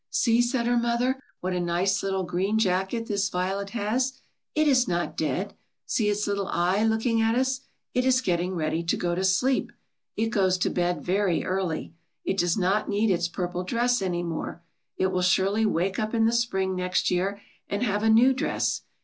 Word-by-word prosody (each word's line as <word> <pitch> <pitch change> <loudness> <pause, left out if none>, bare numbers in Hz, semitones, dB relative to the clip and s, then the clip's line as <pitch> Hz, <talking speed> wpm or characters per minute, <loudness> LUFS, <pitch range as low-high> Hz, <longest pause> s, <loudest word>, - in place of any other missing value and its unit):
"See," 230 0 +3
said 240 0 0
her 240 0 +2
mother, 240 +3 0 0.2
"what 185 +1 -2
a 180 - -1
nice, 180 +3 +1
little 190 -1 -1
green 185 +4 0
jacket 195 +2 0
this 200 -3 0
violet 190 +2 -2
has. 240 +5 -1 0.4
It 310 0 +3
is 255 -3 +4
not 175 0 -1
dead. - - -2 0.3
See 215 -3 +1
its 210 0 0
little 200 -1 -1
eye 180 +5 +1
look 220 +1 +1
ing 230 -2 +2
at 225 +1 +2
us. 260 +1 0 0.3
It 250 - +1
is 260 0 +4
getting 180 -5 -1
ready 160 0 -1
to 170 - 0
go 175 -1 -1
to 185 +2 -1
sleep. 220 +8 +2 0.5
It 225 +1 +1
goes 190 -4 +2
to 180 - 0
bed 175 0 -1
very 190 -2 +1
early. 185 -4 -2 0.3
It 195 - -1
does 175 +1 +2
not 195 +2 +1
need 210 +1 +2
its 175 -1 +1
purple 180 0 -3
dress 240 +4 +1
any 175 -2 -1
more. 170 0 -5 0.3
It 190 0 +1
will 185 -1 0
surely 195 +4 +2
wake 190 +1 0
up 215 +2 -2
in 225 -1 +3
the 225 - +3
spring 190 -5 0
next 180 0 0
year, 190 +3 0 0.3
and 200 +4 -1
have 210 -3 0
a 220 - +2
new 240 +4 +6
dress. 260 - -1
200 Hz, 200 wpm, -26 LUFS, 180-230 Hz, 0.5 s, new